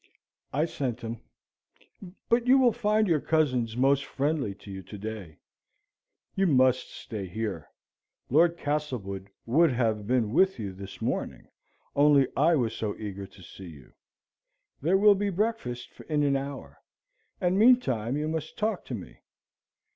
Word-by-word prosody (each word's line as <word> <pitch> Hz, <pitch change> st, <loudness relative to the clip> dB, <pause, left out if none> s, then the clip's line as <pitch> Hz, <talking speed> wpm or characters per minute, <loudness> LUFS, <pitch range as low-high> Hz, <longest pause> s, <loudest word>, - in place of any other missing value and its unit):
"I 150 Hz, +4 st, +1 dB
sent 125 Hz, -7 st, -4 dB
him; 115 Hz, 0 st, -6 dB, 1.1 s
but 235 Hz, +1 st, +2 dB
you 260 Hz, +2 st, +7 dB
will 255 Hz, -3 st, +5 dB
find 215 Hz, -2 st, +1 dB
your 165 Hz, -4 st, +3 dB
cousins 125 Hz, -8 st, +1 dB
most 135 Hz, +2 st, +3 dB
friendly 140 Hz, -7 st, -2 dB
to 100 Hz, 0 st, -12 dB
you 95 Hz, 0 st, -6 dB
to 95 Hz, +3 st, -10 dB
day. 100 Hz, -6 st, -7 dB, 1.0 s
You 195 Hz, 0 st, +2 dB
must 130 Hz, -4 st, +3 dB
stay 105 Hz, -5 st, -7 dB
here. 95 Hz, -5 st, -4 dB, 0.6 s
Lord 170 Hz, +5 st, +3 dB
Castlewood 125 Hz, -, -3 dB, 0.2 s
would 155 Hz, +6 st, +4 dB
have 110 Hz, -4 st, 0 dB
been 120 Hz, -3 st, +1 dB
with 190 Hz, +4 st, +3 dB
you 100 Hz, -4 st, -5 dB
this 95 Hz, +1 st, -9 dB
morning, -, -, -3 dB, 0.5 s
only 145 Hz, -2 st, +5 dB
I 160 Hz, +5 st, +4 dB
was 115 Hz, -5 st, 0 dB
so 105 Hz, -2 st, -3 dB
eager 100 Hz, -2 st, -6 dB
to 95 Hz, -1 st, -17 dB
see 95 Hz, +2 st, -11 dB
you. 70 Hz, -5 st, -15 dB, 0.9 s
There 170 Hz, +7 st, +3 dB
will 205 Hz, +1 st, +7 dB
be 200 Hz, +1 st, -1 dB
breakfast 195 Hz, -, -2 dB, 0.2 s
in 150 Hz, -1 st, +1 dB
an 140 Hz, -1 st, +2 dB
hour; 140 Hz, +1 st, -6 dB, 0.6 s
and 185 Hz, 0 st, +1 dB
meantime 145 Hz, -, +3 dB
you 150 Hz, +1 st, -2 dB
must 160 Hz, -1 st, -4 dB
talk 215 Hz, -2 st, -1 dB
to 125 Hz, -, -4 dB
me. 95 Hz, -, -10 dB
135 Hz, 150 wpm, -27 LUFS, 110-165 Hz, 1.1 s, you